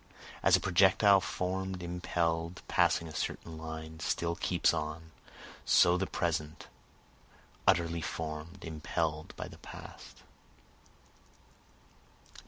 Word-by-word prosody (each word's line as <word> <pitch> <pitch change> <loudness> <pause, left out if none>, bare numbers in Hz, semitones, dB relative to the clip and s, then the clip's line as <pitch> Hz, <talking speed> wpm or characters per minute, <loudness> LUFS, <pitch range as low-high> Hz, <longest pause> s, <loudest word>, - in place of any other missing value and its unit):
(As - - +6
a - - +3
projectile 95 +2 +5
form'd, 95 +1 -3
impell'd, 85 -1 -1
passing 85 - +2
a 80 - -9
certain 80 +1 -4
line, 80 0 -7
still 85 +1 -1
keeps 90 0 +2
on, 80 0 -4 0.5
So 90 0 +5
the 95 +1 0
present, 80 -3 -2 1.0
utterly 85 -1 +3
form'd, 80 +3 -5
impell'd 80 0 -3
by - - -5
the - - -12
past.) - - -11
85 Hz, 100 wpm, -32 LUFS, 80-90 Hz, 1.0 s, As